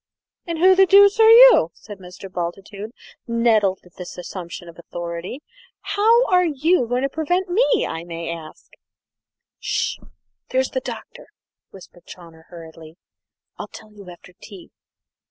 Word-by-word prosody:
"And 335 -1 -4
who 370 +3 +5
the 385 0 +4
dooce 400 +2 +6
are 445 0 +7
you?" - - +8
said 205 -2 -12
Mr. 180 +1 -11
Bultitude, 195 +4 -6 0.4
nettled 225 -5 +1
at 180 - -21
this 180 - -9
assumption 175 -1 -8
of 170 0 -14
authority. 170 - -7 0.4
"How 455 +4 +2
are 360 -4 +3
you 315 -2 +1
going 245 +2 -1
to - - +1
prevent 355 +6 -2
me, 465 +4 +2 0.2
may 165 -1 -6
I - - -4
ask?" - - -24 0.9
"S'sh! - - -2 0.5
here's 260 0 -1
the 260 - -2
Doctor," 255 - -10 0.4
whispered 180 -2 -17
Chawner 165 -2 -14
hurriedly. 165 -1 -13 0.6
"I'll - - -6
tell 215 - -14
you 200 -3 -13
after 180 +1 -15
tea. 195 -5 -13
215 Hz, 145 wpm, -21 LUFS, -, 0.9 s, you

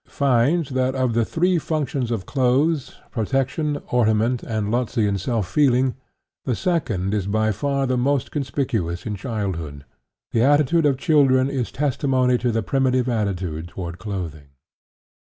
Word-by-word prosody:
366), - - -22
finds 140 +4 +2
that 130 0 +1
of 130 -2 +1
the 115 0 +2
three 175 +8 +1
functions 140 -6 -2
of 110 -6 -2
clothes 135 - +1 0.2
protection, 135 +6 -1
ornament, 115 0 +2
and 110 -2 -2
Lotzean 110 -4 0
"self 110 -1 -1
feeling" 130 -2 +2 0.5
the 125 - -1
second 110 - -1
is 100 -3 -1
by 110 +1 +1
far 140 +6 -1
the 130 -1 0
most 135 +1 0
conspicuous 120 - -2
in 105 -2 -3
childhood. 95 - -4 0.5
The 115 - +2
attitude 150 +4 +4
of 135 -2 +1
children 135 -3 +3
is 130 -4 -2
testimony 130 -3 +1
to 125 - 0
the 115 -1 -1
primitive 130 +1 +1
attitude 95 -8 -2
toward 85 0 -7
clothing. 90 -8 -5
125 Hz, 145 wpm, -22 LUFS, 105-140 Hz, 0.5 s, attitude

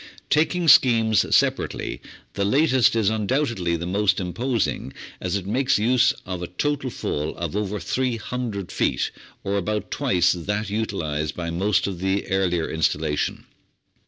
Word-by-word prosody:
Taking 165 +3 +2
schemes 115 -7 +5
separately, - - 0 0.3
the 100 - -1
latest 130 +2 +3
is 110 -2 +2
undoubtedly 110 - 0
the 85 +1 -4
most 100 +3 +1
imposing, 110 - -2 0.3
as - - -2
it 100 -2 -3
makes 130 +6 +1
use 125 +3 +3
of 90 -1 -5
a 90 - -4
total 140 - -2
fall 75 -9 -3
of 85 +1 -4
over 105 0 -2
300 120 -5 -3
feet, 65 - 0 0.3
or 100 +1 -1
about 105 +2 -2
twice 90 -2 +2
that 100 +4 -3
utilised 80 -9 -2
by 85 -1 -4
most 95 +4 +1
of 95 -3 -4
the 95 +2 0
earlier 90 -4 +1
installation. 80 -2 -1
100 Hz, 140 wpm, -23 LUFS, 90-120 Hz, 0.3 s, schemes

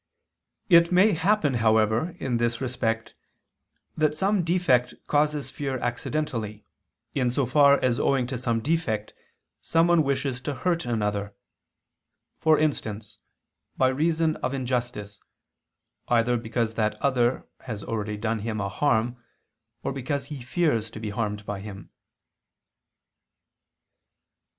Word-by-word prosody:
It 170 -2 +6
may 185 +4 +5
happen, 175 -3 +2
however, 110 +6 +2
in 125 -3 -1
this 120 0 0
respect, 115 -3 -2 0.8
that 155 -1 +1
some 195 +3 +1
defect 160 -8 +2
causes 150 -1 0
fear 135 -2 -3
accidentally, 120 -4 -3 0.5
in 125 -3 +1
so 130 +2 +1
far 140 +2 +5
as 120 -2 +2
owing 135 -3 +2
to 125 +1 -4
some 120 -2 0
defect 130 -8 -1 0.5
someone 165 0 +3
wishes 135 -2 -1
to 140 +1 -3
hurt 170 +4 -1
another; 105 -3 -2 1.0
for 155 -1 +4
instance, 110 -8 -2 0.6
by 130 - +4
reason 160 +3 +1
of 135 - -2
injustice, 120 -6 -3 0.9
either 120 +1 +3
because 115 -1 -1
that 110 -1 0
other 125 -3 +1
has 110 -5 -6
already 105 -2 -3
done 110 +1 -1
him 110 0 -3
a 100 -1 -2
harm, 120 +1 0 0.6
or - - -2
because 140 +1 -3
he 140 - -7
fears 125 -5 0
to 110 - -9
be 110 -1 -4
harmed 105 -1 -3
by 100 -1 -4
him. 100 -1 -9
125 Hz, 125 wpm, -26 LUFS, 110-150 Hz, 1.0 s, It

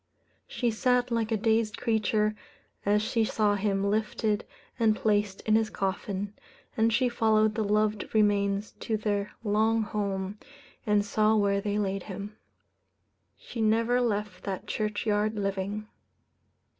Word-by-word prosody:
She 240 -2 -1
sat 250 +2 +1
like 230 -1 0
a 220 - +2
dazed 220 0 +1
creature 215 -2 +1 0.5
as 210 +1 +3
she 225 +1 +1
saw 215 -1 +1
him 195 -1 0
lifted 215 0 0 0.3
and 220 -2 +4
placed 205 -3 0
in 215 - 0
his 220 -1 +2
coffin, 195 0 -3 0.4
and 225 0 +3
she 250 +3 +3
followed 220 -2 +2
the 220 0 -1
loved 210 0 +1
remains 205 -1 +2
to 220 - -1
their 205 -1 -2
long 220 +1 +2
home, 200 -1 -3 0.5
and 210 -1 +3
saw 215 +1 +2
where 200 -1 +2
they 205 0 -1
laid 195 -1 -1
him. 200 +2 -7 1.0
She 230 - -6
never 230 +3 +3
left 210 -5 -2
that 195 -2 -4
churchyard 215 0 -1
living. 200 +1 -3
210 Hz, 135 wpm, -28 LUFS, 205-220 Hz, 1.0 s, and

